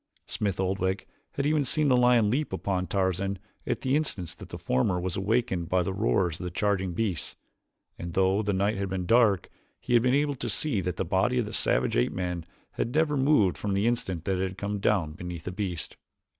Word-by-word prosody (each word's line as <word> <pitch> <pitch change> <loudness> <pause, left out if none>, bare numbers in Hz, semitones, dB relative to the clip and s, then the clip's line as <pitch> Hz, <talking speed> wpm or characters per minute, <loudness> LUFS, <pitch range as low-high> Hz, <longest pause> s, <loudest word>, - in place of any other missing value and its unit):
Smith 100 -3 -2
Oldwick 95 0 -1 0.3
had 140 - -1
even 150 0 +2
seen 150 +3 +1
the 130 - +5
lion 120 -4 +4
leap 145 +5 0
upon 95 -1 -1
Tarzan 95 0 0 0.3
at - - -1
the 130 +1 +1
instant 105 - -1
that - - -11
the - - -6
former 90 +8 +1
was 90 0 -3
awakened 95 -4 0
by 90 -1 +2
the 95 - -2
roars 95 -5 +1
of - - -6
the 90 - -2
charging 95 0 0
beasts, 95 -2 -2 0.6
and 85 0 -5
though 95 +2 +3
the 105 -1 0
night 100 +2 +1
had 100 0 -2
been 95 -1 -2
dark, 110 -3 +4 0.3
he - - -3
had 120 - +6
been 125 +2 +3
able 145 0 +2
to 120 - -3
see 110 0 0
that 90 -1 -2
the 95 - -1
body 95 +8 +1
of 120 - +1
the 105 - -7
savage - - +1
ape - - +2
man 90 -2 -3 0.2
had 120 - -3
never 155 -2 +3
moved 130 - +3
from 100 +6 -1
the 100 +2 +1
instant 95 -8 -1
that 95 -2 0
it 95 - +1
had 95 - -11
come 100 0 -3
down 95 -6 +1
beneath 90 0 -7
the 90 - -4
beast. 90 -4 -4
95 Hz, 220 wpm, -28 LUFS, 90-120 Hz, 0.6 s, had